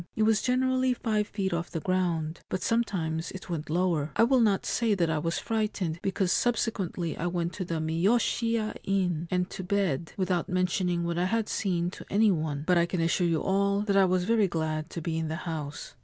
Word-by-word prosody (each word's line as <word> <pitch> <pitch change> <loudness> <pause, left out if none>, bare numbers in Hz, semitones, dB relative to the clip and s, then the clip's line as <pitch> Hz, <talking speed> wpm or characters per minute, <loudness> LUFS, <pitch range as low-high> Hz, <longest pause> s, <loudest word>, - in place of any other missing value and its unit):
It 215 - +2
was 220 -1 +3
generally 255 0 +2
five 215 -3 0
feet 195 -3 -2
off 170 0 -2
the 165 - -3
ground; 170 -2 -1
but 185 - -2
sometimes 175 -8 0
it 190 -1 -8
went 155 -3 -4
lower. 165 -3 +1
I - - +5
will 255 +2 +4
not 210 -4 +2
say 230 -3 +1
that 170 -4 +1
I 155 - 0
was 165 +2 -1
frightened, 205 -7 -2
because 190 -1 0
subsequently 195 -8 0
I 175 - -2
went 170 -1 -2
to 185 - -4
the 170 - -3
Miyoshiya 215 +7 +1
inn, 180 -4 0
and 180 -1 0
to 185 - -5
bed, 180 -6 -1
without 185 -3 0
mentioning 180 -1 0
what 170 0 -1
I 180 - +2
had 225 +3 0
seen 175 -3 -1
to - - -10
any 210 +1 +4
one; 155 -4 -2
but 180 0 +4
I 170 - +2
can 180 - -2
assure 170 +2 +2
you 165 -2 0
all 200 +1 +2
that 205 -1 0
I 195 -1 +6
was 185 0 +1
very 220 -1 +3
glad 155 -2 -2
to 170 - -5
be 160 0 -2
in 160 - -2
the 160 - -3
house. 150 -3 -5
180 Hz, 215 wpm, -28 LUFS, 165-205 Hz, -, I